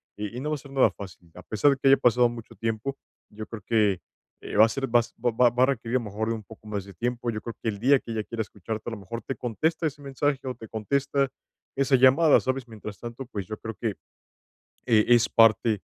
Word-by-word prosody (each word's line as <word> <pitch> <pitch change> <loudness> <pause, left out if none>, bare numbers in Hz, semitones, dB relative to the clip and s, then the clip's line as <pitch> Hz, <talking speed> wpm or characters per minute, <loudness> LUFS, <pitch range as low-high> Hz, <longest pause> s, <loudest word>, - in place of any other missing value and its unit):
y 105 +3 -5
y - - -3
no 140 - -4
va 155 - 0
a - - -5
ser 140 +1 -14
nada 135 -1 +4
fácil, 90 -3 -11
a 90 - -11
pesar 110 +9 +2
de 140 - 0
que 135 - +3
haya 135 - +7
pasado 120 0 +4
mucho 120 -1 -10
tiempo. 115 +4 -3 0.3
Yo 110 +1 -8
creo 115 -3 -8
que, 105 -5 +2 0.4
eh, - - -7
va 110 - +9
a - - -1
ser 135 +3 -2
va 120 - +7 0.2
va 120 0 +3
va 125 +2 +2
a - - +8
requerir 120 -3 -2
a - - 0
lo 115 - -7
mejor 105 +2 -3
de 115 - 0
un 110 - -8
poco 110 +1 -15
más 100 -2 -3
de 100 - -12
tiempo, 120 +5 -2
yo 110 - -4
creo 115 - -7
que 115 - +1
el 100 -2 -5
día 135 +4 +4
que 115 - -9
ella 110 -1 -2
quiera 115 +1 -4
escucharte, 110 +2 -5
a - - -8
lo 115 - -5
mejor 115 +5 -6
te 135 - -3
contesta 160 +7 -1
ese 145 0 -7
mensaje, 140 0 -1
o 130 - -2
te 115 -1 -11
contesta 140 +5 0 0.5
esa 135 0 +3
llamada, 135 +5 +6
¿sabes? 130 -1 -2
Mientras 105 -2 -9
tanto, 120 +3 -7
pues, 100 -7 -6
yo 110 - -5
creo 110 +1 -7
que, 110 -4 -1 0.9
eh, 110 -3 +4
es 120 -1 +5
parte 110 -1 +4
115 Hz, 255 wpm, -26 LUFS, 110-130 Hz, 0.9 s, va